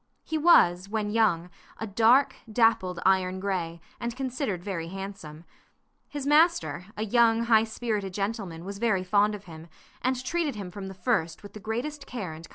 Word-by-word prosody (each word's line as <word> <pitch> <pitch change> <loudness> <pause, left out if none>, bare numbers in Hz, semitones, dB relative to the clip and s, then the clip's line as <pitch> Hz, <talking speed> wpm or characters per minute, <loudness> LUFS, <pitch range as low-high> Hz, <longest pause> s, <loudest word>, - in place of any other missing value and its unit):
He 320 - -4
was, 195 - +5
when 210 -1 -2
young, 180 -6 +2 0.3
a 220 - -4
dark, 230 +6 +4 0.2
dappled 220 -6 +2
iron 190 -1 +2
gray, 180 -4 -2 0.2
and 235 0 -4
considered 255 - -3
very 180 -5 -4
handsome. 190 -4 -8 0.7
His 290 -2 -5
master, 305 - +3
a 215 - -1
young, 230 +1 +4
high 225 -1 +4
spirited 220 -3 -3
gentleman, 195 -5 -3
was 200 +1 -6
very 215 -5 +1
fond 205 +2 +2
of 205 - -10
him, 160 -1 -11 0.3
and 255 0 -1
treated 320 -2 -1
him 195 -4 -6
from 195 0 -7
the 190 - -8
first 180 -4 -1
with 205 - -11
the 215 - -8
greatest 265 +8 -4
care 200 -10 -5
and 160 +1 -10
kindness. - - -18
210 Hz, 175 wpm, -27 LUFS, 185-235 Hz, 0.7 s, was